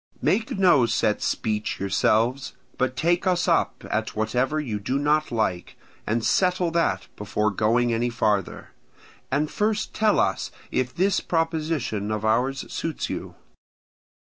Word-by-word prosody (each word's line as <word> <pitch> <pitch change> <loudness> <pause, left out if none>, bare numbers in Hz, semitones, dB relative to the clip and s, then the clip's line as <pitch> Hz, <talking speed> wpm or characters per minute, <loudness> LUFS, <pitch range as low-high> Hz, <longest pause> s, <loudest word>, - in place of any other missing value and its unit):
Make 220 -2 +1
no 175 -11 +5
set 110 -2 +1
speech 105 -1 -2
yourselves, 110 +7 +1 0.3
but 130 0 0
take 175 +6 +1
us 180 -1 +2
up - - +1
at - - -2
whatever 125 +7 0
you 115 -9 -3
do 130 +7 -1
not 150 +2 +1
like, 110 -6 -2 0.3
and 110 +1 0
settle 180 -2 +2
that 170 0 0
before 105 +1 -1
going 115 +4 +2
any 120 +2 0
farther. 105 -5 -1 0.6
And 145 +3 0
first 210 0 -1
tell 215 -1 +2
us - - 0 0.2
if 130 -1 0
this 190 +8 +1
proposition 160 - -1
of 110 0 -2
ours 125 +5 +1
suits 165 -2 -3
you. - - -6
130 Hz, 140 wpm, -24 LUFS, 110-165 Hz, 0.6 s, no